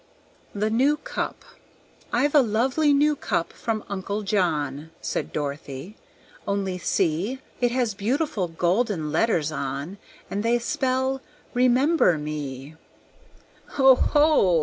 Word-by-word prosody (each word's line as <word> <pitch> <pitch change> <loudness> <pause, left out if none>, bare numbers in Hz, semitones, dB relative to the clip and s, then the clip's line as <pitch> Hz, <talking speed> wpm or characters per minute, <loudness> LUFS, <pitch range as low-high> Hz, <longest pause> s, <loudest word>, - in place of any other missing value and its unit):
The 210 +2 0
New 270 +6 +3
Cup - - -5 0.7
"I've 290 0 +2
a 295 - +7
lovely 255 +6 +2
new 295 +1 +3
cup 170 -10 -2
from 220 -2 -3
Uncle 200 +1 -3
John," 160 -7 -1
Said - - -3
Dorothy; 145 +4 -5 0.5
"only 195 -2 -1
see 175 +9 0 0.2
It 245 - +3
has 240 -3 0
beautiful 215 - -1
golden 170 0 0
letters 165 -9 +1
on, 140 +6 -4 0.3
And 200 - -3
they 230 +2 +2
spell 260 0 -1 0.3
'Remember 255 - +3
Me.'" 150 -2 -5 1.0
"Oho!" 270 - +5
210 Hz, 110 wpm, -24 LUFS, 165-260 Hz, 1.0 s, a